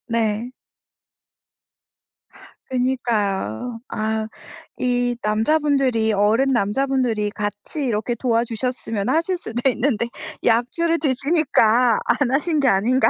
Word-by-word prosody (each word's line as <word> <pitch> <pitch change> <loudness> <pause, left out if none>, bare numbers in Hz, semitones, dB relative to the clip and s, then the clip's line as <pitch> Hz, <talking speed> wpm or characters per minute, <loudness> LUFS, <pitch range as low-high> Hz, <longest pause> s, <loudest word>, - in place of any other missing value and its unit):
네. 230 0 -1 2.2
그니까요. 235 - -1
아 220 0 -2 0.5
이 245 -1 0
남자분들이 250 0 +2
어른 215 +7 +2
남자분들이 240 -1 0
같이 205 +8 -4
이렇게 235 0 -1
도와주셨으면 230 -2 -1
하실 335 +3 +1
수도 240 -4 -2
있는데 240 -2 0 0.4
약주를 290 +9 +1
드시니까 260 -5 +3
안 280 -4 +1
하신 300 +3 +1
게 275 - +3
아닌가. 245 +6 +3
240 Hz, 235 characters per minute, -21 LUFS, 220-270 Hz, 2.2 s, 드시니까